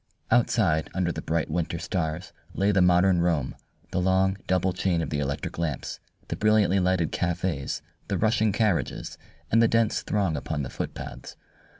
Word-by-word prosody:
Outside 105 -9 +2
under 90 -2 +1
the 80 - -5
bright 80 +1 -1
winter 85 0 -1
stars 80 0 -3 0.2
lay 100 +1 +2
the 95 -2 +3
modern 90 0 +4
Rome, 80 -6 0 0.4
the 90 - 0
long, 95 +1 +2
double 95 0 +1
chain 90 -1 0
of 80 - -3
the 75 - -1
electric 70 +3 -3
lamps, 85 -4 -3 0.3
the - - -3
brilliantly 105 -3 +3
lighted 90 -3 +1
cafes, 85 -5 -2 0.2
the - - -1
rushing 110 -1 +2
carriages, 105 -3 -1 0.3
and 115 - +5
the 115 - +5
dense 115 -1 +2
throng 95 -6 0
upon 75 +1 -3
the 65 - -6
footpaths. - - -6
90 Hz, 165 wpm, -26 LUFS, 80-100 Hz, 0.4 s, and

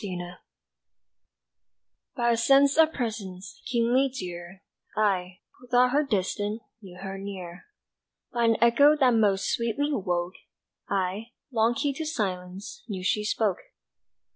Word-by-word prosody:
Presence 180 -3 -5 1.8
BY 240 0 +2
a - - +3
sense 275 +4 +4
of 320 0 +5
Presence, 205 - -5
keenly 250 +2 +2
dear, 180 -4 -7 0.3
I, 185 -4 0 0.2
who 250 - -16
thought 250 0 +4
her 290 +3 +3
distant, 210 -3 -2 0.2
Knew 185 -3 -12
her 195 +1 -6
near. 185 -3 -8 0.7
By 235 -1 +1
an 225 -1 +3
echo 280 +6 +6
that 265 -4 +4
most 205 -4 +2
sweetly 235 +5 0
woke, 180 -5 -1 0.6
I, 195 +3 -1 0.2
long 230 0 +2
keyed 280 +2 -1
to 320 - -3
silence, 190 - -4
Knew 190 -5 -5
she 210 +3 +1
spoke. 210 -3 0
215 Hz, 130 wpm, -27 LUFS, 185-245 Hz, 1.8 s, echo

